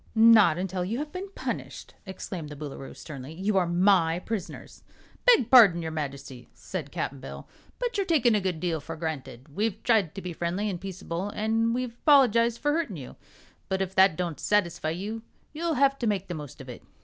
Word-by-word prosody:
"Not 220 -7 +7
until 185 0 -2
you 210 +6 -2
have 295 +2 -4
been 370 +4 -6
punished!" - - -5
exclaimed 185 -4 -6
the 150 - -8
Boolooroo, 140 -2 -8
sternly. 140 -1 -9
"You 195 +5 -1
are 180 -2 +2
my 175 -2 +3
prisoners." 205 +1 -6 0.5
"Beg 450 - +5
parding, 200 -10 +7
your 160 - -4
Majesty," 140 -4 -6
said 160 -7 -6
Cap'n 140 - -4
Bill, 130 - -9 0.3
"but - - -3
you're 400 -2 0
takin' 265 -9 +3
a 210 - +2
good 180 -4 -2
deal 165 -1 -1
for 165 +3 -7
granted. 155 -5 -6
We've 215 0 -1
tried 215 -9 +2
to 195 - -5
be 180 -1 -5
friendly 175 +5 -2
an' 180 -3 -4
peaceable, 190 0 -5
an' 225 +2 +1
we've 245 -1 -4
'poligized 235 -5 +5
for 295 - 0
hurtin' 310 - -2
you; 130 -4 -9 0.5
but 190 - 0
if 190 -1 -2
that 190 -3 +5
don't 170 -4 -3
satisfy 175 -6 0
you, 205 +7 -4 0.3
you'll 325 +1 -1
have 275 +1 +3
to 235 - -1
make 195 -3 -1
the - - -3
most 150 -5 -8
of 135 - -11
it. 125 - -9
190 Hz, 195 wpm, -27 LUFS, 160-230 Hz, 0.5 s, Not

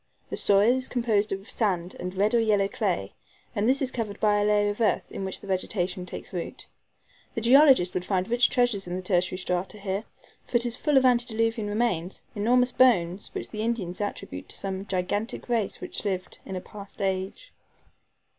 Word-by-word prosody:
The - - -1
soil 200 +3 +4
is 260 - -4
composed 220 -4 +1
of 195 +1 -4
sand 185 -5 -1
and 180 +1 -5
red 205 +3 +2
or 235 - +5
yellow 210 -3 +3
clay, - - -2 0.4
and 210 +2 +2
this 270 +2 +2
is 260 - -1
covered 215 -5 -4
by 210 -1 +3
a - - +2
layer 205 0 +3
of 205 - -6
earth, 220 - +2
in - - -5
which 190 -1 -4
the - - -12
vegetation 185 -1 -2
takes - - -7
root. 175 -2 -5 0.7
The 230 - -1
geologist 255 -6 +6
would 180 - -2
find 185 0 0
rich 240 +1 +3
treasures 245 -6 +1
in 175 - -3
the 185 - -4
tertiary 180 0 +1
strata 180 +2 -2
here, 200 +1 -3 0.4
for 240 - +2
it 235 - +1
is 240 -1 0
full 295 +1 +2
of 260 - +5
antediluvian 225 -3 +2
remains 205 -5 -1
enormous 245 +4 +3
bones, 195 -8 +3
which - - -5
the 215 - -4
Indians 215 -5 -2
attribute 90 - -5
to - - -5
some 195 0 -4
gigantic 195 +4 -2
race 230 -5 0
that - - -4
lived 190 -3 -3
in 190 - -5
a 185 - -3
past 200 +1 -12
age. 195 - -3
205 Hz, 195 wpm, -26 LUFS, 190-235 Hz, 0.7 s, geologist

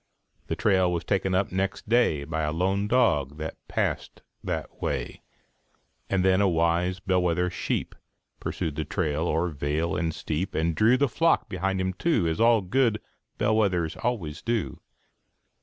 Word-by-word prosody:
The - - -1
trail 95 -4 +2
was 85 -1 -2
taken 95 -2 0
up 95 +2 +1
next 95 +2 -2
day 115 -11 +3
By 80 +2 -3
a 75 0 0
lone 95 +5 0
dog 80 - +2
that 80 0 -5
passed - - -2 0.2
that - - -4
way; - - -3 0.9
And 95 -1 +1
then 95 +1 +4
a 100 - +4
wise 85 +2 +1
bell 95 -1 +1
wether 90 0 +1
sheep - - -2 0.5
Pursued 75 -3 -3
the 80 - 0
trail 75 0 -1
oŌĆÖer 85 +1 0
vale 75 +4 -1
and 80 +1 0
steep, 80 +3 -3
And 80 +1 +1
drew 115 +9 +4
the 140 +2 +3
flock 165 +7 +2
behind 95 +1 -1
him, 95 0 -1
too, 115 - +1
As 80 0 -1 0.3
good 120 -5 +3 0.4
bell 110 +1 +2
wethers 90 -7 +1
always 100 -12 -3
do. 115 -3 -2
90 Hz, 160 wpm, -26 LUFS, 80-100 Hz, 0.9 s, then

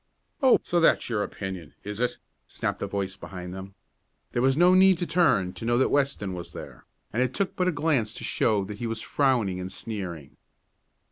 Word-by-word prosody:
"Oh, 265 -2 +6
so 175 - +1
that's 165 -6 +3
your 110 -3 +1
opinion; 95 -6 -6
is 105 +1 -6
it?" 125 0 0 0.3
snapped - - -3
a - - -1
voice 95 -1 -3
behind 90 -2 -8
them. 95 +1 -8 0.6
There 120 - 0
was 135 +2 +3
no 175 +2 +6
need 190 0 +6
to 175 - -2
turn 105 - +2
to 90 - -10
know 120 +1 +2
that 130 - +2
Weston 135 -9 0
was 90 -1 -7
there, - - -10 0.3
and 120 - +1
it 130 0 0
took 200 - -1
but 180 - +1
a - - +3
glance 145 -8 0
to - - -7
show 105 -4 +1
that 105 +1 -8
he 120 - -2
was 115 -1 -4
frowning 120 -10 +1
and 90 +1 -5
sneering. 95 -10 -6
115 Hz, 205 wpm, -26 LUFS, 95-140 Hz, 0.6 s, Oh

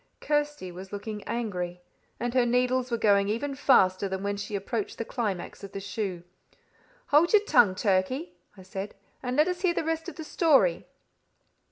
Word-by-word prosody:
Kirsty 295 -10 -1
was 185 +2 -10
looking 210 0 -6
angry, 180 -7 -3 0.4
and 240 0 -2
her 255 -1 +4
needles 250 +1 +1
were 235 - 0
going 200 -2 +3
even 275 +7 -2
faster 200 -8 +3
than 190 0 -4
when 200 0 -1
she 205 +1 -5
approached 200 +2 -3
the 230 - -3
climax 210 -8 -4
of 200 0 -9
the 195 - -4
shoe. 195 -3 -4 0.9
"Hold 310 +6 +4
your 425 -1 +6
tongue, 205 - +4
Turkey," 205 - 0 0.2
I 190 - -12
said, 190 +2 -6 0.3
"and 250 +1 -3
let 305 +3 +5
us 360 -1 -2
hear 355 -3 +2
the - - 0
rest 325 +2 -2
of - - -11
the 320 - -7
story." 275 - +3
225 Hz, 180 wpm, -27 LUFS, 195-285 Hz, 0.9 s, your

